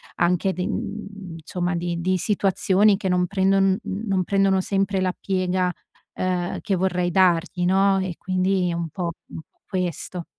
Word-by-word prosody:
anche 180 +2 +2
di 180 - -3
insomma, 180 -4 -4
di 170 0 -2
di 185 +1 +1
situazioni 195 +1 +2
che 195 - -3
non 180 0 +2
prendon 195 0 +2
non 195 -2 -1
prendono 195 0 +2
sempre 195 0 0
la 185 -1 0
piega, 185 -1 0 0.4
ehm, 180 -1 -2
che 200 - 0
vorrei 180 -1 0
dargli, 180 0 +2
no? 195 +1 +3
E 185 -2 -3
quindi 185 -1 0
è - - -2
un 170 -1 -3
po', 170 +2 -3 0.2
mhmm, - - -8 0.3
questo. 180 -2 -3
185 Hz, 150 wpm, -23 LUFS, 180-195 Hz, 0.4 s, no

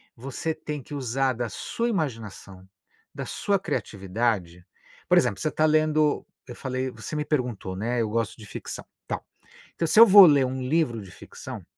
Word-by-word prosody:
você 135 +6 -4
tem 150 -2 -6
que 150 - -12
usar 130 0 0
da 120 0 -3
sua 230 - -3
imaginação, 110 - -5 0.5
da - - -5
sua 200 -2 0
criatividade, 95 - -2 0.4
por - - +5
exemplo, 100 - +2
você 155 - 0
está 155 +1 +1
lendo 155 -1 +2 0.2
eu 120 - -8
falei 130 0 -3
você 115 +5 -7
me 150 - -1
perguntou, 125 -10 -2
né, 115 +5 -1
eu 110 - -1
gosto 115 -2 -1
de 110 - -12
ficção, - - -7 0.2
tal, - - -4 0.5
então 165 - -1
se 215 - +3
eu 230 - +11
vou 200 -2 +10
ler 145 -3 +5
um 130 +1 -3
livro 130 -4 0
de 95 -3 -11
ficção, - - -10
130 Hz, 180 wpm, -25 LUFS, 110-155 Hz, 0.5 s, eu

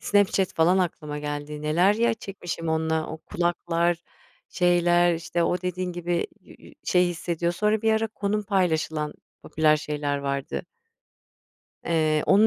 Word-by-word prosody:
Snapchat 200 -2 +2
falan 175 +4 +4
aklıma 155 -5 -2
geldi, 150 0 -5
neler, 175 +7 +3
ya, 235 +1 +2
çekmişim 175 -6 -6
onunla, 160 0 0
o 160 - -6
kulaklar, 175 0 0 0.5
şeyler, 175 -1 +3
işte, 170 +1 -2
o 175 +1 +1
dediğin 180 0 -2
gibi 175 0 -1
yü - - -16
yü - - -15
şey 180 0 +3
hissediyor 170 0 -2
sonra 210 +4 +1
bir 220 0 +3
ara 220 0 +1
konum 210 -1 -2
paylaşılan 160 -6 0 0.3
popüler 155 -1 +3
şeyler 145 -1 -2
vardı. 140 -1 -3 1.2
Eee, 155 -2 +2
onun 205 +3 +6
175 Hz, 140 wpm, -25 LUFS, 155-185 Hz, 1.2 s, onun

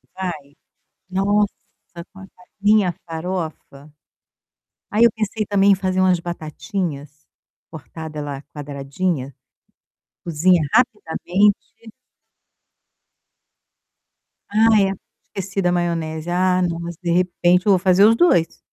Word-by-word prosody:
Vai. 190 -1 -3 0.8
Nossa, 205 +2 +1 0.6
com 190 - -14
essa 190 -1 -16 0.2
minha 205 -3 +3
farofa 160 -4 -6 1.0
Aí, 215 +3 +3
eu 235 - +6
pensei 215 0 -3
também 200 0 +3
em - - +5
fazer 185 0 -2
umas 185 -2 +3
batatinhas, 155 -3 -5 0.5
cortada 160 0 -9
ela 145 -2 -5
quadradinha, 140 0 -4 0.9
cozinha 170 +1 +2
rapidamente 205 -4 +2 2.9
Ai, 215 0 +4
era 195 0 0
pra - - -26 0.3
ter 195 - -3
sido 190 0 -2
a - - +2
maionese. 165 -2 -2
Ah, 180 +1 +2
nossa, 170 -1 -3
de 170 - 0
repente 180 0 +2
eu 205 - +4
vou 190 - +4
fazer 190 +2 +4
os 225 +1 +5
2. 175 - +2
180 Hz, 110 wpm, -20 LUFS, 160-195 Hz, 2.9 s, eu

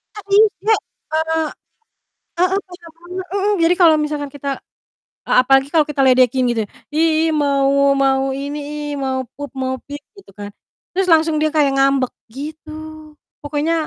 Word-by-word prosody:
Nggak 415 - -9
bisa. 430 +1 +4 0.4
Eee 320 0 0 0.9
heeh, 370 +2 +2
beda 355 -2 -13
banget, 360 +2 -7
heeh, 400 +1 +1
jadi 335 +2 +4
kalau 325 -2 +7
misalkan 300 -1 -2
kita 280 0 -6 0.8
e - - -4
apalagi 270 +1 +3
kalau 320 -2 +4
kita 280 -2 -1
ledekin 255 -1 +4
gitu, 225 - -1 0.3
"Ih 325 +1 +3 0.2
ih - - +1
mau 275 -1 +2 0.4
mau 265 0 +2
ini 285 +2 -4
ih, 300 0 -5 0.2
mau 260 0 -1 0.2
poop, 285 0 -7
mau 260 0 -1
peep," 290 0 -8 0.2
gitu 390 - -18
kan. 205 0 -7 0.4
Terus, 380 0 +1
langsung 320 -1 +4
dia 310 - +2
kayak 290 -3 +3
ngambek, 270 -1 +2 0.2
gitu. 305 +5 -8 0.7
Pokoknya, 295 +2 -1
295 Hz, 155 wpm, -19 LUFS, 270-330 Hz, 0.9 s, kalau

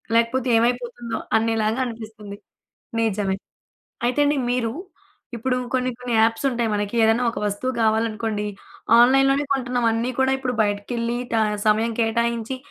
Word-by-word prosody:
లేకపోతే 235 +2 +2
ఏమైపోతుందో 240 0 -1 0.2
అనేలాగా 225 +1 0
అనిపిస్తుంది. 220 -3 -8 0.6
నిజమే. 205 -3 0 0.7
అయితే 250 +4 +1
అండి, 290 0 +1
మీరు 235 -3 0 0.6
ఇప్పుడు 250 +2 -1 0.2
కొన్ని 255 0 +1
కొన్ని 250 -1 -3
యాప్స్ 225 +3 +2
ఉంటాయి. 235 -2 -1
మనకి 205 +1 -2
ఏదైనా 225 +2 +3
ఒక - - -6
వస్తువు 205 +6 -2
కావాలనుకోండి, 220 -1 0 0.5
ఆన్‌లైన్‌లోనే 270 +3 +4
కొంటున్నాం. 250 -2 -1
అన్నీ 230 +3 -1
కూడా 265 0 +3
ఇప్పుడు 255 -2 -2
బయటికెళ్లి 230 +3 -2
ట - - 0 0.3
సమయం 220 +2 +3
కేటాయించి 235 +2 0
230 Hz, 130 wpm, -23 LUFS, 220-250 Hz, 0.7 s, ఆన్‌లైన్‌లోనే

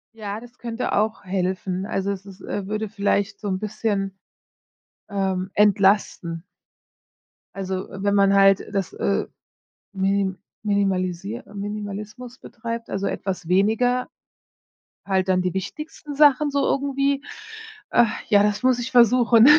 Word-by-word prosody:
Ja, 210 -1 -5
das 245 +1 -14
könnte 235 0 -3
auch 215 +1 0
helfen. 185 0 -2
Also 195 0 -1
es 195 0 -6
ist, 195 -1 -12
äh 195 -2 -4
würde 215 +1 -2
vielleicht 200 0 0
so 210 - -5
'n 185 -1 -1
bisschen, 200 -2 -2 0.9
ähm, 190 -2 -1
entlasten. 195 -4 +3 1.1
Also, 190 -1 -3
wenn 200 +1 0
man 195 -1 +5
halt 195 0 +5
das, 195 -3 -1
äh, 65 -1 0 0.7
mini 195 0 +1 0.3
minimalisiert 195 +1 -1
Minimalismus 210 +4 -6
betreibt, 230 0 -6
also, 195 0 -1
etwas 185 -3 -3
weniger, 225 +7 +2 1.0
halt 190 -1 +1
dann 185 -1 +3
die 180 -1 -1
wichtigsten 295 - -6
Sachen 290 0 +5
so 280 - +1
irgendwie. 275 0 +1 0.7
Ach, 240 -2 +4 0.2
ja, 205 -1 +6
das 210 +1 0
muss 255 -1 +3
ich 245 +1 -4
versuchen. 235 -1 +6
200 Hz, 130 wpm, -23 LUFS, 195-230 Hz, 1.1 s, ja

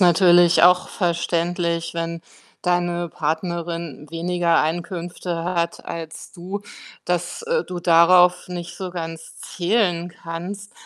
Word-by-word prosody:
natürlich 175 -1 +6
auch 180 +1 +5
verständlich, 170 -1 -1
wenn 165 0 -4 0.4
deine 175 -1 0
Partnerin 165 -1 -3
weniger 170 0 +1
Einkünfte 170 +1 -3
hat 170 -1 -2
als 160 -1 -7
du, 190 +3 -6 0.4
dass, 175 - -2
äh, 475 +1 0
du 180 - -6
darauf 175 +1 +5
nicht 175 -1 -6
so 185 -1 -5
ganz 165 -2 -7
zählen 175 -2 0
kannst. 180 +5 -6
175 Hz, 110 wpm, -22 LUFS, 170-180 Hz, 0.4 s, natürlich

